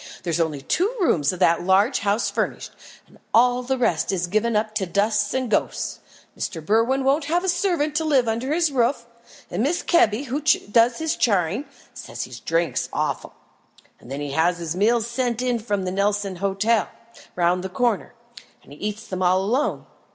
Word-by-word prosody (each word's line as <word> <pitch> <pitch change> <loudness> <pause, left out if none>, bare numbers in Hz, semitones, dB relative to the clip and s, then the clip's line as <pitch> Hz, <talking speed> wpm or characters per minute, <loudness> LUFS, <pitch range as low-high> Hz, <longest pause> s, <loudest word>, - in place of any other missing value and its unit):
"There's 170 -2 -1
only 155 -4 -1
two 370 - +1
rooms 160 - +2
of 185 - -6
that 170 -2 +4
large 195 +8 +3
house 205 +2 0
furnished, - - -3 0.3
and - - -22 0.2
all 245 +2 +4
the 260 +1 -1
rest 180 -11 +1
is 180 -2 -1
given 215 +5 0
up 215 0 0
to 200 -3 -1
dust 205 +3 +1
and 260 -1 0
ghosts. 220 - -1 0.4
Mr. 175 - -4
Berwin 230 +7 +2
won't 280 +3 +2
have 345 +4 0
a - - -2
servant 350 -5 0
to 320 - 0
live 275 -6 +2
under 235 +5 -1
his 325 -1 +2
roof, 250 0 +1 0.5
and 195 +6 -1
Mrs. 340 +6 -1
Kebby, 245 - +3
who 280 +2 -3 0.3
does 235 +2 +4
his 320 -1 -1
charing, 200 - +1 0.3
says - - -6
he - - -10
drinks 165 -5 0
awful. - - -3 0.7
Then 135 +4 -6
he 145 -1 -4
has 170 +4 +2
his 170 -1 -4
meals 225 +4 +2
sent 235 0 -2
in 245 -2 0
from 205 -4 -2
the 180 - -2
Nelson 200 0 -1
Hotel 200 +4 +1 0.5
round 180 +1 +1
the 190 - -4
corner, 235 +3 -1 0.5
and 140 - -14
eats 210 +7 -5
them 185 -1 -5
all 185 +1 +3
alone. 250 +9 -1
215 Hz, 180 wpm, -23 LUFS, 185-255 Hz, 0.7 s, that